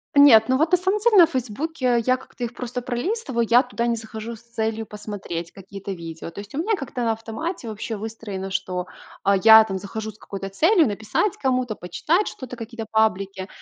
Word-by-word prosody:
Нет, 255 -6 +8
ну 260 - +4
вот, 315 +5 +1
на - - +8
самом 380 +4 0
деле, 440 0 +4
на 345 - +10
"Фейсбуке" 260 -2 -1
я 255 0 +3
как-то 255 -1 -10
их 240 0 -3
просто 250 0 -5
пролистываю. 250 - -2
Я 245 +2 +6
туда 240 -2 -2
не 235 - +1
захожу 220 +1 -7
с 225 - -16
целью 225 -1 -3
посмотреть 205 -6 -6
какие-то 195 +1 -8
видео. 165 -2 -8
То - - -9
есть 205 0 -13
у - - -5
меня 425 +8 +1
как-то 275 -6 -5
на 225 -1 +2
автомате 230 +6 -5
вообще 220 +1 -5
выстроено, 205 -3 -6
что, 180 -1 -2 0.4
а, 200 0 +4
я 220 +3 +9
там 195 -3 -4
захожу 220 +2 -6
с 210 - -22
какой-то 195 -2 -7
целью: 325 - +4
написать 215 - -1
кому-то, 255 -4 0
почитать 315 - 0
что-то, 250 -2 -7
какие-то 230 -1 -7
паблики. 195 -3 0
225 Hz, 200 wpm, -23 LUFS, 205-260 Hz, 0.4 s, на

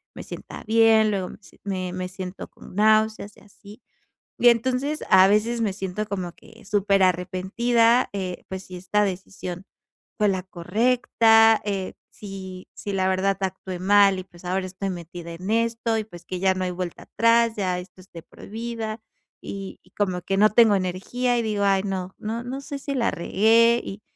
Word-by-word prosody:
me - - -7
sienta - - -9
bien, 220 -1 +4
luego 190 -3 -2
me - - -11
si - - -20
me 185 -2 -3
me 185 0 -3
siento 185 0 -7
con - - -15
náuseas 215 0 +2
y - - -18
así. 205 +3 -16 0.6
Y 245 - +6
entonces 260 +6 0
a 190 0 +7
veces 220 +4 +2
me 210 -4 0
siento 195 +1 -4
como 185 -4 -4
que 225 +5 -18
súper 200 -2 +2
arrepentida, 225 +7 +2
eh, 185 -3 -5
pues, 190 0 -6
si 185 - -9
esta 210 +3 +1
decisión 185 -1 -5 0.5
fue 210 -1 +3
la 190 -1 0
correcta, 225 +4 +3
eh, 195 -2 -3 0.2
si 190 -2 -9
si 205 - -6
la 190 -1 +1
verdad 190 +1 +1
actué 190 -1 -4
mal 195 +1 +4
y, 185 - -5
pues, 175 -1 -18
ahora 185 +1 -1
estoy 190 +1 -4
metida 170 -1 -8
en 180 +4 -6
esto, 230 0 0
y, 215 - -2
pues, 175 -5 -13
que 180 0 -5
ya 190 -1 +3
no 185 0 -2
hay 180 - -2
vuelta 180 -1 -5
atrás, 230 0 +3
ya 185 -3 -1
esto 180 +1 -11
es 185 - -18
de 165 - -9
por - - -15
vida 225 0 -5 0.4
y 195 -1 -7
y 185 - -25
como 185 -3 -2
que 195 - -1
no 215 +1 +6
tengo 220 -1 +5
energía, 200 +7 -1
y - - +1
digo: 210 -2 -1
"Ay 195 -1 +3
no, 190 -1 -4
no 225 +2 -4
no 260 +2 -5
sé 285 -1 -6
si 275 0 -4
la 235 -3 +1
regué", 230 +6 +3
y 200 +2 -8
200 Hz, 190 wpm, -24 LUFS, 185-225 Hz, 0.6 s, a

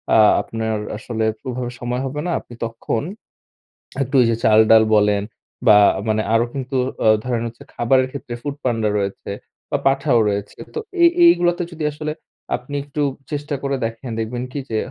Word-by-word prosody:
আ - - +7 0.2
আপনার 110 -1 -3 0.2
আসলে 110 0 -3 0.2
ওভাবে 125 -1 -3
সময় 125 +1 -2
হবে 135 +2 -4
না। 175 - -1
আপনি - - -14
তখন 115 0 -3 1.0
একটু 135 +1 -2
ওই - - +4
যে - - +1
চালডাল 110 0 +6
বলেন 105 -1 +3 0.5
বা 105 -2 +8 0.3
মানে 110 0 +2
আরো 115 +1 +4
কিন্তু 135 0 -4 0.3
আ - - +5 0.2
ধরেন 120 -2 -1
হচ্ছে 115 0 -11
খাবারের 130 +2 +2
ক্ষেত্রে 130 -3 -7
ফুডপান্ডা 125 -7 -1
রয়েছে 100 0 -3 0.4
বা 145 - +2
পাঠাও 135 -2 +3
রয়েছে। 100 0 -4 0.2
তো 455 - -2 0.2
এই 340 - +8 0.2
এই 340 - +10
গুলোতে 175 0 +1
যদি 160 -1 -6
আসলে 150 +1 -4 0.4
আপনি 125 +4 -7
একটু 145 +1 -4 0.3
চেষ্টা 145 0 -3
করে 140 0 0
দেখেন, 115 +2 -5
দেখবেন 120 +2 -3
কী 145 - -4
যে 110 - -1
120 Hz, 170 wpm, -20 LUFS, 110-140 Hz, 1.0 s, এই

